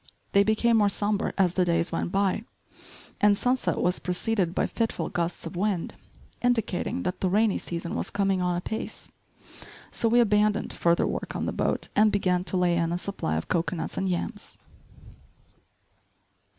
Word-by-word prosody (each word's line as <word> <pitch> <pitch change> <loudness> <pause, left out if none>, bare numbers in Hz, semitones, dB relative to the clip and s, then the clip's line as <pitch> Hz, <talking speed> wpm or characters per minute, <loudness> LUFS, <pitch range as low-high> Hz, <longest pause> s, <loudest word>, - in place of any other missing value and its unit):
They 200 - +5
became 220 +3 +3
more 205 -2 +4
sombre 205 +1 -1
as 185 -3 +3
the 185 - +2
days 170 -1 +1
went - - -2
by, 195 +2 +1 0.8
and 205 -1 +5
sunset 250 +3 0
was 180 0 +1
preceded 180 0 -1
by - - +2
fitful 230 -1 -2
gusts 170 0 -2
of 165 +3 -6
wind, 190 -1 -1 0.5
indicating 245 +1 0
that 180 - -3
the 185 - +2
rainy 210 +2 +2
season 170 0 -4
was - - -2
coming 195 -2 +1
on 180 -1 +1
apace. 220 +5 -5 0.8
So 230 - +1
we 240 +2 +4
abandoned 210 -2 +2
further 170 0 +2
work - - -4
on - - -2
the - - -1
boat - - -1
and 210 0 +5
began 180 -3 +1
to 185 +2 0
lay 175 -1 +2
in 165 0 0
a 175 - 0
supply 180 - -3
of 80 - -4
cocoanuts 170 -1 -2
and 190 - -1
yams. 175 -1 -4
195 Hz, 165 wpm, -27 LUFS, 175-210 Hz, 0.8 s, They